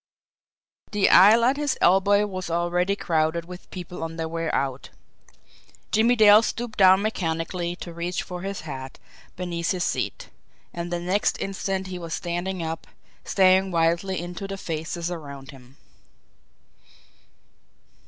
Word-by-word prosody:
The 205 -2 +2
aisle 215 +5 +7
at 265 +3 +2
his 290 -2 -1
elbow 200 +3 +4
was 185 -3 -5
already 175 +3 0
crowded 165 -2 0
with 180 +1 -11
people 180 -2 -8
on 165 0 -5
their 165 -1 -3
way 165 0 -3
out. 135 -1 -2 1.0
Jimmie 230 +3 +4
Dale 215 -1 +7
stooped 230 0 -4
down 190 +1 +6
mechanically 175 -3 -2
to 175 -1 -9
reach 170 +1 -3
for 180 -1 -7
his 195 +1 -5
hat 135 -4 -8 0.4
beneath 175 -2 -3
his 180 -2 0
seat - - -3 0.4
and 170 0 -5
the 175 - -1
next 185 +4 0
instant 195 0 -3
he 185 -1 -6
was 165 -1 -4
standing 175 +1 -3
up, 160 0 -5 0.4
staring 190 0 +4
wildly 170 +2 +1
into 175 +3 -6
the 195 0 -5
faces 165 0 -4
around 140 -5 -8
him. 130 0 -17
180 Hz, 140 wpm, -24 LUFS, 165-195 Hz, 1.0 s, aisle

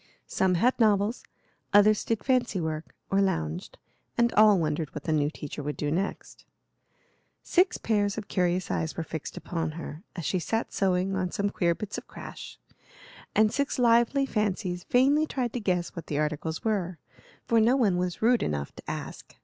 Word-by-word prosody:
Some 185 -1 +1
had 245 +10 +2
novels, 210 0 +3 0.5
others 210 +1 +6
did 225 -2 -1
fancy 250 -6 +1
work 160 -1 -4 0.2
or 195 0 +3
lounged, 80 - -2 0.4
and 235 0 +3
all 215 -1 +6
wondered 155 -2 -2
what 150 - -5
the 160 - -1
new 145 -1 +2
teacher 150 -1 -7
would 150 +1 -4
do 145 -1 -1
next. 190 +5 -3 1.0
Six 360 +1 +2
pairs 205 -2 0
of 215 -2 -5
curious 180 -1 0
eyes 160 - -2
were 165 - -1
fixed 160 -2 -6
upon 165 -2 -3
her, 160 -1 -7
as 170 -4 -5
she 185 - 0
sat 225 +6 -2
sewing 190 0 +1
on 185 -1 -1
some 200 +2 -1
queer 170 -3 +1
bits 210 +2 -5
of - - -18
crash, - - -9 0.8
and 215 0 +4
six 280 0 -1
lively 240 +3 +4
fancies 190 -6 -1
vainly 280 +5 +3
tried 250 -5 -2
to 245 - -2
guess 180 -5 -1
what 170 - -7
the 145 - -2
articles 155 +1 -2
were, 185 -6 -1 0.5
for 230 - +3
no 235 +4 +4
one 210 -8 +3
was 180 +2 -2
rude 240 0 +4
enough 70 -2 -2
to - - -10
ask. - - -7
190 Hz, 180 wpm, -27 LUFS, 165-225 Hz, 1.0 s, others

